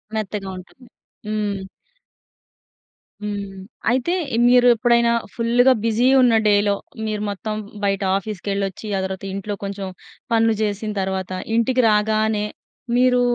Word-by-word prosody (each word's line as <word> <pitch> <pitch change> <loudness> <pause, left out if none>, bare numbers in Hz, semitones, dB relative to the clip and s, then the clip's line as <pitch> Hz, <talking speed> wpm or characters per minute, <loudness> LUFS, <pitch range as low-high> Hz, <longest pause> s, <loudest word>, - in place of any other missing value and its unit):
మెత్తగా 210 -2 -3
ఉంటుంది. 240 +7 -14 0.4
హ్మ్. 205 -2 -2 1.6
హ్మ్. 200 -2 -5 0.3
అయితే, 260 +8 +1 0.2
ఇ - - 0
మీరు 245 0 +6
ఎప్పుడైనా 235 0 +3 0.2
ఫుల్లుగా 245 +3 +4
బిజీ 230 +2 +2
ఉన్న 245 -3 +5
డేలో 205 -1 +3 0.3
మీరు 215 -1 -2
మొత్తం 205 +2 -4 0.3
బయట 195 0 +1 0.2
ఆఫీస్కెళ్ళొచ్చి, 200 0 -4
ఆ - - 0
తర్వాత 190 0 -5
ఇంట్లో 200 +1 -4
కొంచెం 195 -1 -4 0.4
పనులు 225 0 +3
జేసిన 210 0 -1
తర్వాత 190 -1 -3 0.2
ఇంటికి 250 +2 +2
రాగానే, 215 0 +1 0.5
మీరు 250 0 +4
215 Hz, 115 wpm, -21 LUFS, 200-235 Hz, 1.6 s, మీరు